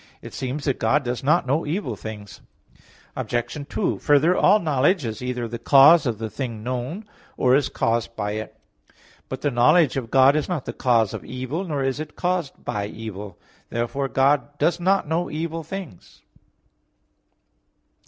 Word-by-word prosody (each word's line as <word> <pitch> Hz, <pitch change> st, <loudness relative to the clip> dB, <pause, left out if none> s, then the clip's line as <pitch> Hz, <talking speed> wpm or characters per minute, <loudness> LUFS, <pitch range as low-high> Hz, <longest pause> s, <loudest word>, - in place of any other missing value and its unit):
2), -, -, -16 dB
it -, -, -20 dB
seems 135 Hz, +3 st, -4 dB
that 135 Hz, -4 st, 0 dB
God 135 Hz, +6 st, +2 dB
does 125 Hz, 0 st, -3 dB
not 155 Hz, +4 st, +3 dB
know 140 Hz, +5 st, 0 dB
evil 150 Hz, -, -3 dB
things. 105 Hz, +2 st, -9 dB, 0.7 s
Obj. 130 Hz, +4 st, -3 dB
2: -, -, -1 dB
Further, 150 Hz, +4 st, +3 dB
all 200 Hz, +3 st, +5 dB
knowledge 155 Hz, 0 st, +1 dB
is 110 Hz, 0 st, -5 dB
either 125 Hz, -1 st, -3 dB
the 120 Hz, +1 st, -6 dB
cause 145 Hz, +2 st, +6 dB
of 115 Hz, -3 st, -1 dB
the 110 Hz, +1 st, -4 dB
thing 110 Hz, 0 st, -5 dB
known, 130 Hz, -, -4 dB, 0.3 s
or 130 Hz, -1 st, +4 dB
is 140 Hz, -1 st, +1 dB
caused 115 Hz, 0 st, -1 dB
by 105 Hz, -1 st, -2 dB
it. 110 Hz, +1 st, -6 dB, 0.7 s
But 130 Hz, 0 st, -5 dB
the 145 Hz, -, 0 dB
knowledge 135 Hz, +4 st, +4 dB
of 120 Hz, -4 st, -4 dB
God 135 Hz, +3 st, +5 dB
is 155 Hz, -, -1 dB
not 165 Hz, -7 st, -2 dB
the -, -, -5 dB
cause 115 Hz, -5 st, +2 dB
of -, -, -6 dB
evil, 130 Hz, +8 st, -4 dB
nor 145 Hz, -5 st, -2 dB
is 135 Hz, +1 st, -1 dB
it 155 Hz, -, -7 dB
caused 180 Hz, -5 st, -2 dB
by 100 Hz, -1 st, -2 dB
evil. 105 Hz, -3 st, -8 dB, 0.3 s
Therefore 120 Hz, +4 st, -2 dB
God 140 Hz, +2 st, +1 dB
does 170 Hz, +3 st, +1 dB
not 190 Hz, -1 st, +2 dB
know 165 Hz, +3 st, -1 dB
evil 165 Hz, +1 st, -3 dB
things. 165 Hz, -, -9 dB
135 Hz, 175 wpm, -23 LUFS, 120-155 Hz, 0.7 s, cause